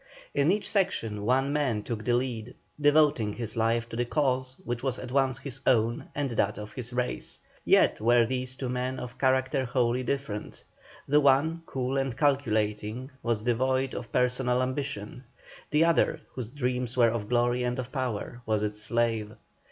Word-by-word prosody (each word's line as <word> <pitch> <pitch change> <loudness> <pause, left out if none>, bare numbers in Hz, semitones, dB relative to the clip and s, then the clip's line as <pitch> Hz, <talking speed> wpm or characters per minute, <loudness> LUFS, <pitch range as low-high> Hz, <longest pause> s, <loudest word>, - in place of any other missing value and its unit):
In 145 +4 +3
each 210 +1 -1
section 110 - 0
one 135 +4 +2
man 130 -8 0
took 110 -2 -4
the 120 0 +2
lead, 120 -2 -3 0.2
devoting 145 -7 +4
his 115 -2 -5
life 115 +1 +1
to - - -6
the 120 - +1
cause 130 -1 0
which 120 0 -3
was 130 -2 -1
at - - -7
once 135 -1 +2
his 135 -2 -4
own 115 -2 +2
and 140 -3 -1
that 105 -3 0
of 105 0 -8
his 125 -1 -5
race; 125 0 -2 0.3
yet - - +4
were 120 +1 +5
these 130 +1 -3
two 130 - -4
men 125 +1 -2
of 125 0 -8
character 130 +1 +2
wholly 125 -1 +1
different. 125 -5 -4 0.4
The 150 +2 +4
one, 145 +4 +3
cool 130 +1 -2
and 135 -2 -2
calculating, 115 -3 0
was 115 -3 -1
devoid 130 +2 +1
of 120 - -6
personal 125 0 +2
ambition; 130 -3 -4 0.5
the 155 +2 +4
other, 165 -1 +2
whose 125 -4 -5
dreams 125 -2 -2
were 120 -2 +6
of 110 -3 -4
glory 120 0 +2
and 125 0 -1
of 130 0 -5
power, 125 -3 -3
was 110 -1 +1
its 105 0 -2
slave. 115 -2 0
125 Hz, 175 wpm, -28 LUFS, 115-135 Hz, 0.5 s, were